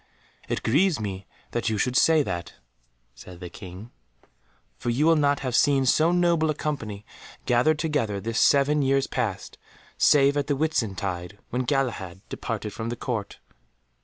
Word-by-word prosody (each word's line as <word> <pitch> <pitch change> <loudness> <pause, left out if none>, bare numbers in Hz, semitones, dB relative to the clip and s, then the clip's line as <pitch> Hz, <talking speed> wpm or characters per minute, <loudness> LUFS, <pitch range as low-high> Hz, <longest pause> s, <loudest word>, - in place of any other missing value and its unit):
"It - - -2
grieves 160 - +2
me 100 -2 -5 0.4
you 110 -2 0
should 125 +4 0
say 160 +2 +5
that," 85 -6 -5 0.6
said 85 +8 -12
the 90 -1 -8
King, 95 +4 -10 0.8
"for 120 - -4
you 130 +6 +1
will 165 0 +5
not 145 -2 +2
have 130 -3 -2
seen 140 -1 +3
so 155 +6 +4
noble 170 -3 +2
a 155 - 0
company 110 -10 -4 0.4
gathered 125 +6 +3
together 145 -11 -1
this 110 +3 -2
seven 145 +1 +4
years 135 0 +2
past, - - -4 0.4
save 140 0 +5
at 145 - -1
the 145 - +1
Whitsuntide 100 - -2
when 125 +1 -1
Galahad 120 -9 -2
departed 105 - -4
from 115 0 -4
the 120 - -3
Court." 115 -4 -4
125 Hz, 155 wpm, -25 LUFS, 105-145 Hz, 0.8 s, say